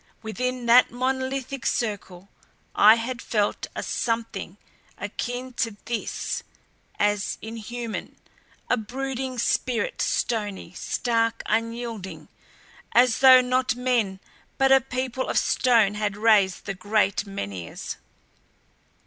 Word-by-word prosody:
Within 250 +3 -3
that 240 +2 +6
monolithic 260 +1 -2
circle 200 -5 -2 0.5
I 215 +2 +7
had 235 +1 -4
felt 210 -2 -1
a - - -3
something 225 -5 -3 0.4
akin 245 +5 -5
to 225 -3 -1
this, 235 -2 -3 0.6
as 205 -1 0
inhuman; 230 +1 -6 0.5
a 250 - +2
brooding 260 +3 -4
spirit 250 - 0
stony, 205 -7 -1
stark, 230 +2 -1
unyielding 230 -2 -3 0.6
as 245 -1 +4
though 260 -1 +9
not 255 0 +1
men 240 -6 0 0.4
but 270 0 +3
a 270 0 +7
people 255 +1 -3
of - - 0
stone 230 -6 +3
had 210 -1 -2
raised 205 -4 +3
the 195 - -3
great 205 +1 0
Menhirs. 100 - -6
230 Hz, 105 wpm, -25 LUFS, 210-255 Hz, 0.6 s, though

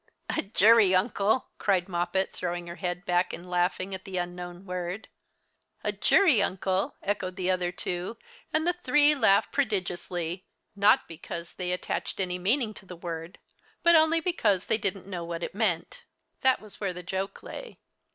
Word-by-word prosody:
"A - - +1
jury 210 -1 +5
uncle!" 205 +4 +1
cried 185 -3 +2
Moppet, 185 +1 -1
throwing 175 -1 -3
her 170 +1 -8
head 180 -1 -3
back 175 +1 +1
and 175 - -8
laughing 180 +2 0
at 190 - -5
the 190 -1 -5
unknown 175 +1 -5
word. 180 +2 -4 0.7
"A - - +1
jury 320 - +4
uncle!" 190 0 0
echoed 190 -2 -2
the 185 -1 0
other 180 -1 0
two, 180 +4 -4 0.3
and 310 +1 +1
the 350 - +3
three 295 -3 +4
laughed 220 -8 +3
prodigiously; 180 - -2 0.3
not 200 +1 +5
because 170 +1 -7
they 180 -1 -3
attached 180 - -3
any 180 -1 -1
meaning 220 +4 +1
to 195 - -12
the 180 - -8
word, 165 +1 -6 0.5
but 340 0 +7
only 320 +1 +5
because 225 - +1
they 220 - +1
didn't 195 -2 -2
know 180 -3 -5
what 170 0 -5
it - - -4
meant. 185 -6 -1 0.4
That 260 0 +4
was 215 -2 -13
where 195 -3 -1
the 180 0 -8
joke 190 +2 -4
lay. - - -8
185 Hz, 170 wpm, -28 LUFS, 175-215 Hz, 0.7 s, but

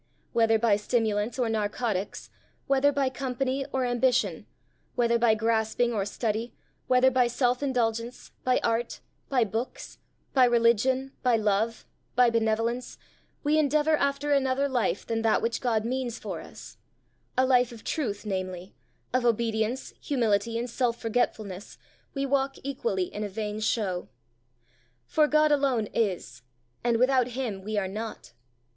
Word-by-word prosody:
Whether 225 -1 +4
by 215 -2 +3
stimulants 215 0 0
or 250 -2 +1
narcotics, 215 -2 -2 0.3
whether 275 +1 +3
by 275 -2 +1
company 265 +1 -2
or 260 -1 0
ambition, 245 +1 +1 0.5
whether 235 -1 +2
by 230 -2 +4
grasping 225 +2 +1
or 200 -3 0
study, 220 +2 -3 0.3
whether 255 +1 +5
by 250 -1 +3
self 245 +1 +1
indulgence, 235 -3 -1
by 255 0 +3
art, 230 +1 -1 0.3
by 255 -3 +3
books, 225 +4 -5 0.3
by 260 -2 +6
religion, 240 +3 +2
by 250 -2 +3
love, 215 +1 0 0.3
by 245 -1 +5
benevolence, 230 +2 0 0.5
we 305 +1 +3
endeavour 305 +1 +3
after 280 0 0
another 275 0 +2
life 250 -4 -1
than 225 -1 -1
that 225 -1 +3
which 230 0 -2
God 225 -3 +1
means 245 -1 -2
for - - -6
us - - -12 0.6
a 260 - +4
life 250 -2 +3
of 230 -2 -11
truth, 220 -9 -3
namely, 185 -2 -4 0.4
of 255 -1 +2
obedience, 230 +1 0
humility, 230 -4 +1
and 240 +1 -2
self 240 -1 -1
forgetfulness, 215 -4 -2 0.4
we 275 0 0
walk 275 0 0
equally 280 - -1
in 210 - -3
a 205 - -3
vain 210 +1 -4
show. 205 -5 -1 1.0
For 305 - +3
God 305 0 +4
alone 275 -6 +2
is, 180 - -1 0.4
and 235 -1 +2
without 255 0 +3
him 220 -8 -3
we 210 +2 -4
are 195 -2 0
not. 215 - -7
235 Hz, 145 wpm, -27 LUFS, 220-260 Hz, 1.0 s, by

